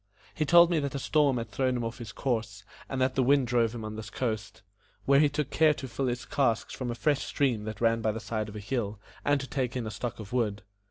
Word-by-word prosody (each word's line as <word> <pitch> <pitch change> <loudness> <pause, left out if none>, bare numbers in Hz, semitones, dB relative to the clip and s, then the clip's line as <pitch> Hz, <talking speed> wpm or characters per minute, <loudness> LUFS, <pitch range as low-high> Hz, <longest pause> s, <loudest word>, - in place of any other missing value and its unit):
He 155 - -1
told 170 +2 +7
me 165 - +3
that 140 -1 -3
a - - 0
storm 140 -1 +2
had 115 -2 -5
thrown 130 -2 0
him 120 - -2
off 115 +2 -4
his 115 -3 -7
course, 110 -4 -2 0.3
and 135 - -3
that 130 0 +2
the 135 - +2
wind 135 +1 +4
drove 120 -1 +1
him 110 -2 -5
on 110 0 -6
this 110 -1 -7
coast, 110 -2 -3 0.4
where 140 0 +5
he 150 -1 +5
took 145 -1 -2
care 155 -1 +4
to 135 - -6
fill 130 +2 -2
his 120 0 -2
casks 125 -6 0
from 130 -2 -4
a 120 - -2
fresh 145 +3 +1
stream 120 -7 0
that 110 0 -6
ran 115 -1 +3
by 110 -1 +1
the 110 - -5
side 110 -1 -3
of 105 - -10
a - - -4
hill, 105 -2 -3 0.2
and 145 0 +2
to 135 - -5
take 130 -2 -2
in 120 - -3
a 110 - -4
stock 120 +1 -5
of 110 +1 -8
wood. 105 -5 0
120 Hz, 270 wpm, -29 LUFS, 110-135 Hz, 0.4 s, told